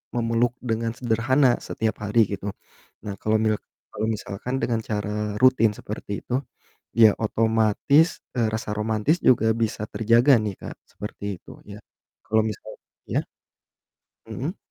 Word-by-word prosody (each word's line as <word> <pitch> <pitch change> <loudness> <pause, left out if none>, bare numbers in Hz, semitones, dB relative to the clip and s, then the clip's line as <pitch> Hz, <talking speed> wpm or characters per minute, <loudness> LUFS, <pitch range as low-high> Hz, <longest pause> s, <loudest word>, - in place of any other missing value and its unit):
memeluk 115 0 +1
dengan 115 -1 -1
sederhana 125 +3 +2 0.2
setiap 110 -1 -1
hari 105 +3 +1
gitu. 100 +1 -5 0.6
Nah 100 -1 -4
kalau 110 0 +2
milk 110 -1 +1 0.3
kalau 110 +1 -1
misalkan 110 +5 -5
dengan 115 -2 0
cara 105 -1 -3 0.3
rutin 130 -4 +5
seperti 105 -1 -7
itu 125 - -6 0.7
ya 110 -2 +9
otomatis, 110 +8 +3 0.3
eee, 115 -2 +2
rasa 110 -1 -3
romantis 110 +9 +1
juga 115 -3 +5 0.2
bisa 105 -1 -2
terjaga 115 +5 +4
nih 105 -2 -2
Kak - - -7 0.2
seperti 105 0 -8
itu - - -18 0.2
ya 100 - -8 0.5
kalau 110 0 +3
misal 105 - -8 0.4
ya? - - 0 1.0
Hmm. 160 +10 -4
110 Hz, 135 wpm, -24 LUFS, 105-120 Hz, 1.0 s, ya